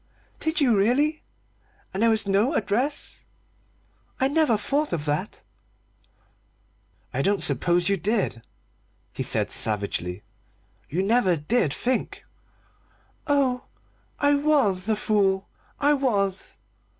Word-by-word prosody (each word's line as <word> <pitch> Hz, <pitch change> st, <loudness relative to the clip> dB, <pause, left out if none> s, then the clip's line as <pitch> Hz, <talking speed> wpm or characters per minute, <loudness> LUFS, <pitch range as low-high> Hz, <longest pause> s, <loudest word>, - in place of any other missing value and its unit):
"Did 315 Hz, +2 st, 0 dB
you 255 Hz, -6 st, +3 dB
really? 275 Hz, +10 st, +2 dB, 0.7 s
And 195 Hz, -, -3 dB
there 230 Hz, -, +5 dB
was 220 Hz, -1 st, +1 dB
no 205 Hz, +10 st, +2 dB
address? 235 Hz, +8 st, -1 dB, 1.0 s
I 265 Hz, -, +3 dB
never 295 Hz, -7 st, +2 dB
thought 290 Hz, +7 st, -1 dB
of 155 Hz, -3 st, -2 dB
that." 150 Hz, 0 st, -3 dB, 1.7 s
"I 130 Hz, -, 0 dB
don't 200 Hz, +5 st, +2 dB
suppose 175 Hz, +6 st, +2 dB
you 200 Hz, 0 st, +2 dB
did," 200 Hz, -, -1 dB, 0.7 s
he -, -, -5 dB
said -, -, 0 dB
savagely; 100 Hz, -3 st, -1 dB, 0.7 s
"you 180 Hz, +6 st, -1 dB
never 200 Hz, -4 st, +3 dB
did 155 Hz, -, 0 dB
think!" 250 Hz, -, -2 dB, 1.0 s
"Oh, 270 Hz, -4 st, +1 dB, 0.5 s
I 290 Hz, 0 st, +3 dB
was 275 Hz, -10 st, +1 dB
a 220 Hz, -, +3 dB
fool! 200 Hz, -2 st, +1 dB, 0.3 s
I 290 Hz, +1 st, +4 dB
was!" 200 Hz, -9 st, -1 dB
215 Hz, 115 wpm, -25 LUFS, 185-275 Hz, 1.7 s, there